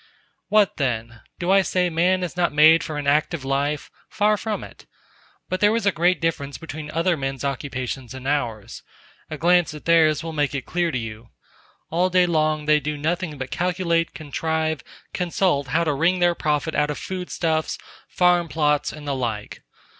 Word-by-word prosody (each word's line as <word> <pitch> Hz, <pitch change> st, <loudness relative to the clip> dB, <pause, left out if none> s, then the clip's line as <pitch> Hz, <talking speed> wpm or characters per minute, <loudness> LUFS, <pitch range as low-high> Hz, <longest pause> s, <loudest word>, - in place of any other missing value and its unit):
What 210 Hz, -2 st, +3 dB
then? 120 Hz, -4 st, -2 dB, 0.2 s
do 175 Hz, +1 st, -1 dB
I 195 Hz, 0 st, +6 dB
say 180 Hz, 0 st, +1 dB
man 180 Hz, +3 st, +2 dB
is 175 Hz, -1 st, -4 dB
not 175 Hz, -2 st, +1 dB
made 155 Hz, +2 st, +6 dB
for 155 Hz, -, -5 dB
an 145 Hz, -, -4 dB
active 150 Hz, +1 st, +1 dB
life? 140 Hz, +2 st, -1 dB, 0.2 s
Far 210 Hz, 0 st, +2 dB
from 215 Hz, 0 st, -3 dB
it!... -, -, -13 dB, 0.6 s
But 185 Hz, -, -2 dB
there 210 Hz, +2 st, +4 dB
is 230 Hz, -, -1 dB
a 200 Hz, -, +4 dB
great 175 Hz, +1 st, +2 dB
difference 145 Hz, -4 st, -2 dB
between 155 Hz, -1 st, -7 dB
other 170 Hz, +3 st, +1 dB
men's 135 Hz, -2 st, -4 dB
occupations 130 Hz, -2 st, -4 dB
and 130 Hz, 0 st, -7 dB
ours.... 120 Hz, -8 st, -2 dB, 0.5 s
A 155 Hz, -, -5 dB
glance 175 Hz, 0 st, +3 dB
at 150 Hz, -, -11 dB
theirs 160 Hz, -2 st, +4 dB
will 165 Hz, -1 st, -5 dB
make 145 Hz, -2 st, 0 dB
it 130 Hz, -, -4 dB
clear 175 Hz, -1 st, 0 dB
to 135 Hz, -, -2 dB
you. 115 Hz, 0 st, -7 dB, 0.6 s
All 175 Hz, +3 st, +2 dB
day 180 Hz, 0 st, +4 dB
long 155 Hz, -2 st, +1 dB
they 150 Hz, 0 st, +4 dB
do 150 Hz, +1 st, -3 dB
nothing 160 Hz, +1 st, -2 dB
but 130 Hz, 0 st, -6 dB
calculate, 170 Hz, +1 st, 0 dB
contrive, 160 Hz, +1 st, -2 dB, 0.3 s
consult 175 Hz, -5 st, 0 dB
how 160 Hz, +6 st, +1 dB
to 155 Hz, -3 st, +1 dB
wring 165 Hz, +6 st, +2 dB
their 175 Hz, -1 st, +3 dB
profit 150 Hz, -1 st, -1 dB
out 150 Hz, 0 st, +1 dB
of 150 Hz, -, -3 dB
food 185 Hz, -1 st, -5 dB
stuffs, 160 Hz, -2 st, -1 dB, 0.3 s
farm 175 Hz, -1 st, +3 dB
plots 150 Hz, -2 st, +1 dB
and 150 Hz, -1 st, -10 dB
the 140 Hz, -, 0 dB
like. 115 Hz, -5 st, -4 dB
155 Hz, 185 wpm, -23 LUFS, 140-175 Hz, 0.6 s, I